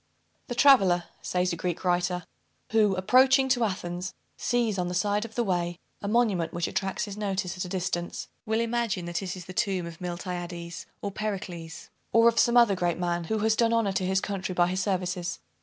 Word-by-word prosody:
"The 245 - -4
traveller," 195 -11 +6 0.2
says 180 0 0
a - - -1
Greek 175 0 -3
writer, 180 0 +1 0.5
"who, 215 -3 +4
approaching 260 +7 +5
to 245 -2 +3
Athens, 180 -3 -3 0.2
sees 230 -5 0
on 180 - 0
the 180 - -3
side 205 +3 +1
of 225 - -11
the 240 - +1
way 175 -4 -1 0.2
a 200 - -4
monument 210 -7 +1
which 175 0 -1
attracts 195 0 -2
his 205 -1 -7
notice 195 -3 -2
at 185 - -3
a - - -7
distance, 175 -2 -3 0.2
will 220 0 0
imagine 230 -6 -1
that 170 +1 -3
it 185 -1 -4
is 180 -2 -9
the 185 - -8
tomb 185 -1 0
of 170 0 -9
Miltiades 175 -1 -5 0.2
or 200 - -2
Pericles, 190 -6 -5 0.2
or 230 0 +6
of 230 0 +4
some 240 0 +4
other 235 -4 +6
great 175 -2 0
man, 175 -1 -1
who 220 +6 -1
has 220 0 +3
done 230 0 +3
honor 225 -4 +2
to 190 -1 0
his 190 +1 +2
country 190 -2 -3
by 175 - +4
his 185 +1 -1
services. 180 -3 -1
190 Hz, 205 wpm, -27 LUFS, 175-220 Hz, 0.5 s, traveller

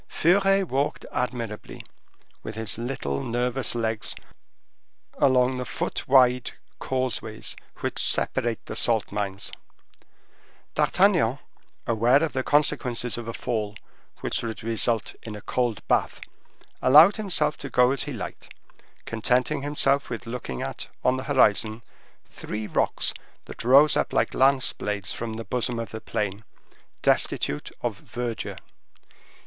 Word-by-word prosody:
Furet 195 +3 +3
walked 140 +1 -1
admirably, 115 -4 -4 0.6
with 110 - -7
his 110 0 -1
little 70 - -3
nervous 125 - -1
legs, 110 -2 -1 1.0
along 130 -1 +3
the - - -2
foot - - -3
wide 125 -2 +4 0.3
causeways 125 -4 -2 0.3
which - - -2
separate 115 -1 -1
the - - -6
salt 115 -3 +1
mines. 100 -1 -3 1.2
D'Artagnan, - - +3 0.5
aware 120 +6 +3
of 160 - -1
the 130 - 0
consequences 125 -4 +1
of 120 -1 -6
a 115 - -4
fall, 110 -4 -3 0.5
which - - -1
would 115 -1 -5
result 115 0 +1
in 110 -2 -7
a - - -7
cold 120 -2 -2
bath, - - +1 0.6
allowed 155 - +7
him 215 -2 -4
to 150 -4 +1
go 125 0 +4
as 135 -4 0
he - - -5
liked, - - -7 0.5
contenting 125 +6 0
himself 140 -1 +1
with 115 0 -5
looking 115 - -5
at, - - -5 0.2
on 125 +1 +3
the 130 - -5
horizon, 110 -4 +3 0.4
three 105 0 -6
rocks, - - 0 0.3
that - - -7
rose 140 +5 +6
up - - 0
like - - +1
lance 135 0 +3
blades 105 -1 -3
from 115 -1 -4
the 115 0 -6
bosom 120 +2 -1
of 115 -3 -5
the 110 - -6
plain, 105 0 -3 0.6
destitute 75 - +1
of - - -2
verdure. 120 -1 -5
120 Hz, 130 wpm, -25 LUFS, 110-130 Hz, 1.2 s, allowed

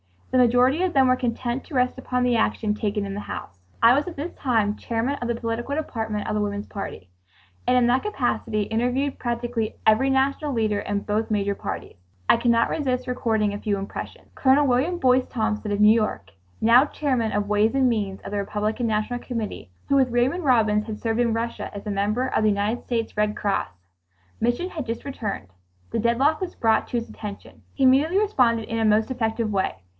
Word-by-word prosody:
The - - +2
majority 250 +5 +4
of 370 -2 0
them 265 -2 +5
were 255 - +3
content 245 0 -2
to 300 - -9
rest 250 0 +1
upon 250 -1 -1
the 245 -1 +2
action 220 -1 +1
taken 210 -1 -2
in 195 - -5
the 205 - -4
House. 100 - -7 0.2
I 230 +1 +8
was 285 +5 +1
at 350 - -6
this 300 +5 -5
time 220 -6 0
Chairman 235 +4 -1
of 245 -3 -4
the 235 - 0
Political 235 +4 -3
Department 220 -8 -3
of - - -1
the 210 - 0
Woman's 205 0 -3
Party, 195 - -7 0.6
and 250 0 +4
in 245 - +4
that 250 +2 +3
capacity 245 - -1
interviewed 250 +6 -1
practically 235 -2 -2
every 220 +5 +4
national 275 +2 +1
leader 215 -3 0
in 205 0 -2
both 215 +2 -1
majority 200 -2 -1
parties. - - -5 0.3
I - - +7
can 235 +1 0
not 230 0 +3
resist 255 -4 -1
recording 220 -4 0
a 205 - -5
few 205 -1 -1
impressions. 195 0 -7
Colonel 275 +2 +4
William 275 +7 +1
Boyce 255 -4 +3
Thompson 220 -3 -2
of 205 0 0
New 210 +1 +8
York, 215 - -1 0.3
now 240 +5 +6
Chairman 255 -7 -1
of 205 0 -1
Ways 210 +4 +2
and 265 -2 +4
Means 205 -4 -2
of - - -8
the 205 - -2
Republican 210 +4 -1
National 220 +3 -1
Committee, 230 - -5 0.2
who 275 - +4
with 260 -2 +3
Raymond 260 +8 +1
Robins 215 -5 +3
had 215 -1 -5
served 225 0 -1
in 235 -2 +2
Russia 230 +1 -3
as 200 - -7
member 210 +5 0
of - - 0
the 215 - +4
United 205 +3 -1
States 230 -3 -2
Red 210 0 +1
Cross. 200 -2 -1 0.7
Mission, 240 +11 0
had 310 -7 -5
just 230 -1 -4
returned. 220 - -5 0.4
The 230 - -1
deadlock 245 +7 +2
was 370 -2 -5
brought 225 -2 +2
to 245 - -2
his 230 - -4
attention. 205 -2 -9
He 270 - -1
immediately 280 +8 +4
responded 250 - +2
in 225 - -1
a 225 - +2
most 215 +3 +3
effective 225 -3 -1
way. 195 -2 0
230 Hz, 205 wpm, -24 LUFS, 210-255 Hz, 0.7 s, I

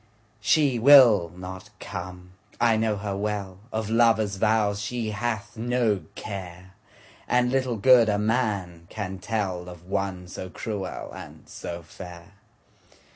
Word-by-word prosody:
She 130 +3 +3
will 120 - +7
not 95 +2 -8
come, 90 -1 -7 0.3
I 115 -1 +4
know 110 -1 +1
her 100 -1 -3
well, 100 -2 -3
Of 110 -1 -2
lover's 110 -3 +3
vows 105 -1 +2
she 110 +1 -3
hath 110 0 -3
no 115 -3 0
care, 95 -2 -8 0.5
And 125 0 +2
little 130 -3 0
good 120 +1 +6
a 105 - +2
man 105 -7 -1
can 95 -3 -5
tellOf 90 -5 -3
one 95 -1 -3
so 90 +1 -7
cruel 100 +1 -5
and - - -11
so 85 0 -7
fair. 85 +3 -11
105 Hz, 130 wpm, -25 LUFS, 95-115 Hz, 0.5 s, will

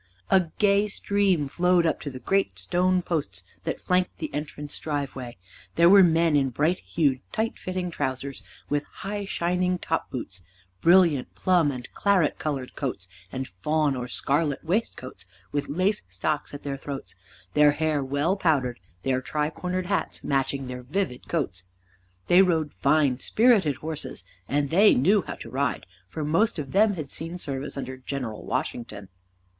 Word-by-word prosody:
A 185 -3 +5
gay 205 0 +4
stream 200 -6 +1
flowed 175 +3 +3
up 160 - 0
to 145 - -4
the 130 - -8
great 195 - 0
stone 180 - +1
posts 100 - -2 0.2
that - - -2
flanked 180 0 0
the 155 -3 -5
entrance 145 0 -5
driveway. 135 -5 -4 0.4
There 170 +2 +6
were 200 0 +9
men 165 -2 +4
in 135 -2 +3
bright 155 +8 +1
hued, 140 -6 0
tight 225 +1 -2
fitting 185 -1 -3
trousers 135 -2 -3 0.3
with 145 0 +1
high 205 +1 -5
shining 180 0 0
top 165 -1 -2
boots, 95 -7 -5 0.4
brilliant 170 -6 +4
plum 175 -6 +3
and 125 -2 -6
claret 195 -6 +2
colored 140 -4 -3
coats 120 -10 -3 0.2
and 130 0 -4
fawn 150 +8 0
or 125 -1 -4
scarlet 145 +3 0
waistcoats, 160 - -3 0.2
with 145 -1 -2
lace 185 +8 +1
stocks 145 - -2
at 145 - -9
their 140 -1 -3
throats, 135 0 -6 0.4
their 150 -1 +6
hair 155 -2 0
well 145 +7 +1
powdered, 140 - +1 0.2
their 130 -1 +1
tri 150 +3 -1
cornered 180 +3 -3
hats 195 +1 -2
matching 135 0 0
their 125 0 -6
vivid 145 0 -3
coats. 95 - -2 0.6
They 180 +2 +6
rode 160 -5 +1
fine, 140 -3 +2
spirited 210 - +3
horses, 150 -3 -5 0.2
and 145 0 0
they 200 +5 +6
knew 190 +11 +4
how - - -4
to - - -10
ride, 140 +1 -1 0.2
for 155 +8 -4
most 195 +10 +2
of 140 -3 -5
them 205 +1 +4
had 150 -5 -6
seen 165 +2 -4
service 140 -4 -4
under 130 -1 -5
General 130 -4 -5
Washington. 105 -5 -4
150 Hz, 160 wpm, -26 LUFS, 135-180 Hz, 0.6 s, were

